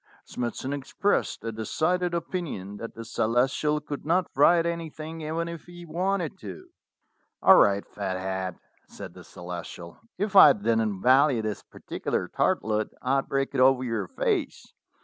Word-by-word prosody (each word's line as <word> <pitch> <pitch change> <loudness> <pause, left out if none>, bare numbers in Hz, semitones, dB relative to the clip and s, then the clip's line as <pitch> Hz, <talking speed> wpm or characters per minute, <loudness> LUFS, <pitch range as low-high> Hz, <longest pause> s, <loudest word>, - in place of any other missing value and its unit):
Smithson 125 +3 -4
expressed 145 +9 -1
a 115 - -3
decided 170 +11 -1
opinion 160 - -4
that 115 +2 -8
the 115 - -8
Celestial 125 +7 +1
could 145 -1 -7
not 175 +3 +1
write 165 +4 +5
anything 165 -1 -5
even 160 +2 -3
if 170 -2 -8
he 175 0 -11
wanted 180 +2 -2
to. 370 - -9 0.7
"All 190 - +8
right, 100 0 +4
Fathead," 95 -2 -4 0.3
said - - -10
the - - -12
Celestial: 85 -1 -9 0.2
"if 200 +1 -2
I 150 -7 +10
didn't 110 -3 -1
value 130 -2 +4
this 105 -2 -3
particular - - -4
tartlet 110 0 0 0.2
I'd 135 +1 0
break 135 0 -1
it - - +1
over 130 0 +5
your 115 -6 -2
face. - - -2
135 Hz, 145 wpm, -26 LUFS, 110-170 Hz, 0.7 s, I